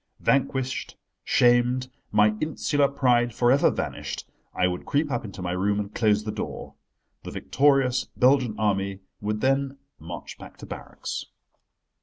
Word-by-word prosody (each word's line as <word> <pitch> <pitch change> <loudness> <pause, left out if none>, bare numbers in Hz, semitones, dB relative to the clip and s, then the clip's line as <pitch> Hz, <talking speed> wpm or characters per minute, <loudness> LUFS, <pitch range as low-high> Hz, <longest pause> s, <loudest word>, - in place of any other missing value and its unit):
Vanquished, 130 -1 0 0.3
shamed, 125 +1 +3 0.2
my 105 0 +4
insular 145 -2 +1
pride 120 -3 +2
for 120 0 +3
ever 140 - +5
vanished, - - -4 0.2
I 90 - +1
would 90 0 -1
creep 145 +1 +1
up 120 - -1
into 100 -2 -7
my 90 - -2
room 100 +3 +1
and 105 0 -4
close 105 -2 +2
the 105 - -3
door. - - -6 0.5
The - - -8
victorious 135 -3 +2
Belgian 125 -3 +4
Army 100 -2 0 0.2
would 105 +1 -2
then 135 +1 +1 0.2
march 85 +2 -8
back - - -12
to - - -10
barracks. - - -6
120 Hz, 145 wpm, -25 LUFS, 105-135 Hz, 0.5 s, ever